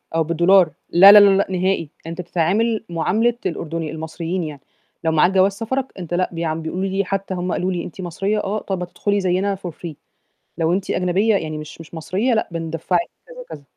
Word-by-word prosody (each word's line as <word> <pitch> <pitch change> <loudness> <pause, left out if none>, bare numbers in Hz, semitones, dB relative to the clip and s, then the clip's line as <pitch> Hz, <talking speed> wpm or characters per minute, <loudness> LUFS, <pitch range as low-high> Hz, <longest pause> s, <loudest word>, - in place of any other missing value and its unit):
أو 165 - +3
بالدولار 170 +1 +4 0.2
لا، 195 +3 +9
لا، 210 - +10
لا، 205 -1 +7
لأ 200 - +1
نهائي، 185 -4 0 0.2
أنت 170 +2 -5
تتعامل 205 +7 0
معاملة 220 +8 +1
الأردني 165 -2 -3
المصريين 165 +3 -4
يعني، 150 -3 -7 0.4
لو 160 - +1
معاك 160 +4 +4
جواز 190 +1 +4
سفرك 235 +6 -3
أنت 175 -1 -6
لأ، 185 +1 +1
بيعم 165 -1 -2
بيقولوا 180 +4 -3
لي 195 +1 -1
حتّى 195 0 -3
هم 180 0 -3
قالوا: 185 +1 -1
"لي 175 - -2
إن - - -4
أنت 180 - -9
مصرية؟" 195 +4 -2
"آه." 210 +2 -2
"طَب 190 -3 -4
هتدخُلي 205 +3 -1
زيّنا 190 +1 0
for 185 -2 -7
free، 165 +1 -8 0.7
لو 165 0 +1
أنت 190 +1 -1
أجنبية 185 +5 +1
يعني 155 -4 -4
مش 150 +1 -10
مش 165 +1 -12
مصرية، 195 +9 -1
لأ 220 - 0
بندفَّعك،" 165 +1 -1 0.3
كذا - - -13
وكذا. 320 - -10
180 Hz, 200 wpm, -20 LUFS, 165-195 Hz, 0.7 s, لا